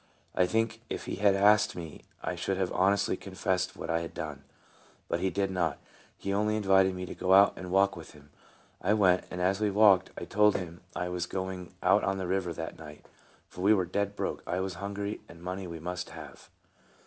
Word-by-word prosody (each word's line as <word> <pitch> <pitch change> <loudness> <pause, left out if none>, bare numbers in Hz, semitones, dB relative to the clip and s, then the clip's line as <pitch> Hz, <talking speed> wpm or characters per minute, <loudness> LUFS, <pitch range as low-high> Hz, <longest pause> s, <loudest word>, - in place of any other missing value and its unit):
I 90 - +3
think 110 +3 0
if - - -4
he - - -4
had 100 0 +4
asked 105 +2 +4
me 80 -4 -8 0.2
I 90 - -2
should 95 +2 -2
have 95 -2 -1
honestly 100 +2 +2
confessed 95 -1 -2
what - - -4
I 85 - +2
had 85 - -7
done. 75 -4 -6 0.6
But 85 - -1
he 95 +2 +1
did 100 0 -1
not. 85 -5 0 0.4
He 100 - -3
only 105 +1 +1
invited 95 -2 +4
me 90 0 -4
to - - -7
go 95 +1 +3
out 100 +1 +7
and 90 -1 -7
walk 95 +1 +3
with 80 -2 -11
him. 75 -1 -18 0.5
I 100 +4 +2
went; 90 -4 +3
and 90 - -6
as 95 +3 +1
we 105 - +2
walked 100 -2 +5
I - - -5
told 105 0 +3
him 85 -2 -5
I 90 0 -2
was 90 -1 -3
going 95 -1 -5
out - - +4
on 95 0 0
the 95 - -3
river 90 -1 -1
that 80 -1 -6
night, 75 -2 -11 0.4
for 90 - -10
we 105 +3 +5
were 95 -3 +1
dead 100 +3 -2
broke, - - -3
I 90 - -1
was 95 0 -2
hungry, 100 +1 -4
and 85 - -13
money 90 +2 -5
we 85 -1 -7
must 90 +2 -5
have. - - -11
95 Hz, 220 wpm, -29 LUFS, 90-100 Hz, 0.6 s, out